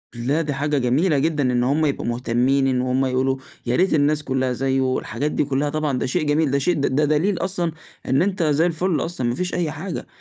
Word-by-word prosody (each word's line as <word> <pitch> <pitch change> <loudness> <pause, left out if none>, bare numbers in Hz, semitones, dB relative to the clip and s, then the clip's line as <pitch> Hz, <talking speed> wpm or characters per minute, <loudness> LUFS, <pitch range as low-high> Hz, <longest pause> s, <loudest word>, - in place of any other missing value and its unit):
لا، 135 +7 0
دي 150 -3 -2
حاجة 145 +2 -1
جميلة 140 +6 +2
جدًا، 150 0 0
إن 120 0 +1
هم 145 +5 +2
يبقوا 140 - -1
مُهتمّين، 125 +3 +1
إن 130 -1 +1
هُم 130 +1 +1
يقولوا 130 +1 0 0.3
يا 120 0 0
ريت 185 +6 +2
الناس 150 0 +2
كلّها 130 -2 -1
زيُّه، 130 +1 0
الحاجات 140 +7 -3
دي - - +1
كلّها 140 +1 -1
طبعًا 150 -3 -1
ده - - -1
شيء 130 - 0
جميل، 145 -1 +2
ده 140 - +2
شي 175 +6 +1
ده 145 -1 +1
دليل 155 +6 +1
أصلًا 180 -3 -1 0.3
إن 130 +2 +2
أنت 190 -1 0
زي 155 +1 +2
الفل 175 0 0
أصلًا، 165 -8 -2
ما 120 - -1
فيش 180 +5 -3
أي 170 -4 -1
حاجة. 160 +3 -6
145 Hz, 225 wpm, -22 LUFS, 130-160 Hz, 0.3 s, جميلة